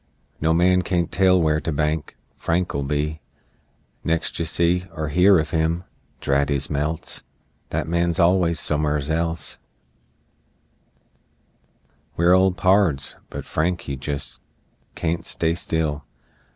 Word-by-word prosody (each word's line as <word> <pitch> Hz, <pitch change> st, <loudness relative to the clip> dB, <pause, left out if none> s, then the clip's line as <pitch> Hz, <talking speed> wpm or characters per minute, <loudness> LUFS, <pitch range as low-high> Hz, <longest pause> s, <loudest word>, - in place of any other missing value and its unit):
No 80 Hz, +1 st, +2 dB
man 90 Hz, +2 st, +4 dB
can't 90 Hz, -2 st, -1 dB
tell 95 Hz, 0 st, +4 dB
where 80 Hz, -2 st, +2 dB
to 80 Hz, -, -3 dB
bank 75 Hz, +1 st, -2 dB, 0.2 s
Frank'll 85 Hz, -4 st, -1 dB
be, 75 Hz, +2 st, -2 dB, 0.8 s
Next 80 Hz, 0 st, -1 dB
you 85 Hz, -, 0 dB
see 85 Hz, +2 st, +1 dB
Er 75 Hz, -1 st, -2 dB
hear 90 Hz, +5 st, +5 dB
of 80 Hz, -1 st, -1 dB
him! 80 Hz, +2 st, 0 dB, 0.4 s
Drat 70 Hz, +1 st, +1 dB
his 70 Hz, 0 st, 0 dB
melts! 75 Hz, +2 st, -3 dB, 0.5 s
That -, -, -2 dB
man's 85 Hz, 0 st, 0 dB
allus 85 Hz, -2 st, +3 dB
somers 75 Hz, -1 st, 0 dB
else! 80 Hz, 0 st, -2 dB, 2.6 s
We're 85 Hz, +2 st, +5 dB
old 95 Hz, 0 st, +4 dB
pards. 90 Hz, -6 st, +2 dB
But -, -, -7 dB
Frank 85 Hz, +3 st, -1 dB
he 70 Hz, -, -5 dB
jest 70 Hz, +2 st, -6 dB, 0.5 s
Can't 85 Hz, 0 st, -2 dB
stay 80 Hz, 0 st, -1 dB
still! 80 Hz, -3 st, -2 dB
80 Hz, 125 wpm, -23 LUFS, 75-85 Hz, 2.6 s, hear